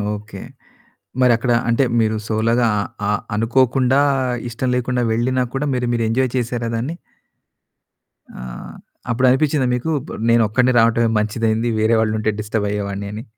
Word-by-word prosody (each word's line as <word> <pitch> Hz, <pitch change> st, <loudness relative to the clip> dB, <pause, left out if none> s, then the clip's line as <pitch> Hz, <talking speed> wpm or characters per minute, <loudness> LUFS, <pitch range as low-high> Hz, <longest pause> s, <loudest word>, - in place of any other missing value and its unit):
Okay. 105 Hz, -1 st, -10 dB, 0.8 s
మరి 125 Hz, -1 st, +5 dB
అక్కడ 120 Hz, +1 st, 0 dB, 0.2 s
అంటే, 115 Hz, +4 st, +3 dB, 0.2 s
మీరు 110 Hz, -1 st, +1 dB
సోలోగా 115 Hz, +2 st, +1 dB
అ -, -, +1 dB, 0.3 s
అ -, -, +2 dB, 0.2 s
అనుకోకుండా, 130 Hz, +4 st, +2 dB, 0.5 s
ఇష్టం 120 Hz, +2 st, -3 dB
లేకుండా, 125 Hz, 0 st, -1 dB
వెళ్ళినా 125 Hz, +3 st, 0 dB
కూడా, 145 Hz, +2 st, -1 dB
మీరు, 125 Hz, -1 st, -1 dB
మీరు 115 Hz, -1 st, 0 dB
ఎంజాయ్ 130 Hz, +2 st, +1 dB
చేసారా 120 Hz, -1 st, -2 dB
దాన్ని? 130 Hz, +9 st, -3 dB, 1.5 s
ఆ! -, -, -7 dB, 0.7 s
అప్పుడు 130 Hz, +2 st, +2 dB
అనిపిచ్చిందా 135 Hz, 0 st, +2 dB
మీకు, 145 Hz, +7 st, -2 dB, 0.2 s
బ -, -, -11 dB, 0.2 s
నేనొక్కడినే 115 Hz, +2 st, +3 dB
రావడమే 115 Hz, 0 st, +3 dB
మంచిదయింది. 110 Hz, +2 st, 0 dB
వేరే 110 Hz, +1 st, +3 dB
వాళ్ళుంటే 110 Hz, 0 st, 0 dB
డిస్టర్బయ్యేవాడిని 105 Hz, -2 st, -3 dB
అని? 110 Hz, -, -6 dB
115 Hz, 135 wpm, -19 LUFS, 110-125 Hz, 1.5 s, మరి